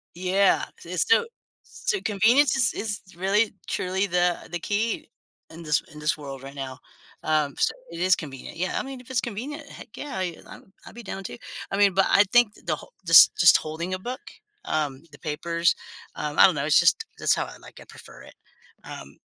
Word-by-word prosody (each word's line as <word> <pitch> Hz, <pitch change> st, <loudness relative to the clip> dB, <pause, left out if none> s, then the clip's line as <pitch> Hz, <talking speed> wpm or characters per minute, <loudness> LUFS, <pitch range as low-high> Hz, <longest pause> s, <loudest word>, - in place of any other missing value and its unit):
Yeah. 185 Hz, +2 st, +2 dB, 0.2 s
It's -, -, -1 dB
sti 455 Hz, +1 st, +3 dB, 0.4 s
So, 390 Hz, -5 st, -3 dB
convenience 235 Hz, +6 st, +3 dB
is 245 Hz, -5 st, +2 dB
is 205 Hz, -1 st, -4 dB, 0.2 s
really 200 Hz, +5 st, +1 dB
truly 190 Hz, +2 st, -1 dB
the 180 Hz, -1 st, 0 dB
the 175 Hz, -, -3 dB
key 210 Hz, +5 st, -2 dB, 0.4 s
in 165 Hz, +1 st, -10 dB
this 150 Hz, -1 st, +1 dB
in 150 Hz, -, -10 dB
this 150 Hz, +2 st, 0 dB
world, 135 Hz, -2 st, -8 dB
right 135 Hz, +1 st, -10 dB
now. 130 Hz, -2 st, -6 dB, 0.4 s
Um, 155 Hz, -2 st, +1 dB
so -, -, +2 dB, 0.2 s
it 170 Hz, -, -7 dB
is 185 Hz, +1 st, +4 dB
convenient. 140 Hz, 0 st, -9 dB
Yeah, 185 Hz, +2 st, -2 dB
I -, -, -3 dB
mean, 265 Hz, -2 st, -8 dB
if 250 Hz, -, -18 dB
it's 245 Hz, -, +2 dB
convenient, 280 Hz, +7 st, -6 dB
heck, -, -, -12 dB
yeah, 285 Hz, -9 st, -6 dB
y 175 Hz, -3 st, -3 dB
I'm 190 Hz, -, -14 dB
I'd -, -, -12 dB
be 240 Hz, -, -9 dB
down 195 Hz, 0 st, -6 dB
too. 120 Hz, -8 st, -7 dB, 0.3 s
I 195 Hz, -, -1 dB
mean, 200 Hz, -2 st, +4 dB
but 195 Hz, +1 st, +3 dB
I 200 Hz, -, +6 dB
think 240 Hz, -3 st, +4 dB
the 155 Hz, -2 st, 0 dB
hol -, -, -14 dB
just 165 Hz, -, +8 dB
just 175 Hz, -, +7 dB
holding 165 Hz, +4 st, -5 dB
a 185 Hz, -, -2 dB
book, 250 Hz, +6 st, -6 dB, 0.4 s
um, 145 Hz, -2 st, -2 dB
the 145 Hz, -, -15 dB
papers, 165 Hz, +2 st, 0 dB, 0.4 s
um, 150 Hz, -1 st, -4 dB
I -, -, +10 dB
don't 185 Hz, -5 st, +3 dB
know, 140 Hz, 0 st, -1 dB
it's 150 Hz, -, +5 dB
just 170 Hz, -, +3 dB
that's -, -, +3 dB
how -, -, -2 dB
I -, -, -11 dB
like -, -, -14 dB
it, -, -, -15 dB
prefer -, -, -13 dB
it. -, -, -15 dB, 0.5 s
Um -, -, -10 dB
185 Hz, 210 wpm, -25 LUFS, 155-215 Hz, 0.5 s, I